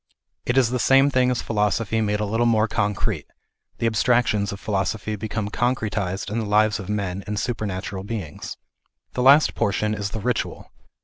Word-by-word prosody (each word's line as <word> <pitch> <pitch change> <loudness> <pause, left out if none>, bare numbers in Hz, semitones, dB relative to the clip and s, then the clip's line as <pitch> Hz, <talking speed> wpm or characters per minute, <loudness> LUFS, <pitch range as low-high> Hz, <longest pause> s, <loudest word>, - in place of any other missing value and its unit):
It 125 - +1
is 125 -3 +4
the 125 - 0
same 135 +3 +5
thing 130 -1 +3
as 125 -2 -1
philosophy 110 +1 0
made 105 -1 0
a 105 - 0
little 115 +3 +1
more 110 -1 +3
concrete, 105 -3 -1 0.5
the - - -2
abstractions 115 -2 +2
of 100 - -7
philosophy 105 +2 -2
become 105 0 -3
concretized 105 -6 -1
in 115 - -1
the 110 - -2
lives 105 0 +3
of 95 -1 -7
men 100 -2 -2
and 105 0 -2
supernatural 100 -4 -3
beings. 100 -8 -6 0.6
The 125 - -1
last 140 +4 +6
portion 105 +2 0
is 100 -2 -3
the 110 - -5
ritual. 120 +1 -3
105 Hz, 175 wpm, -23 LUFS, 100-115 Hz, 0.6 s, last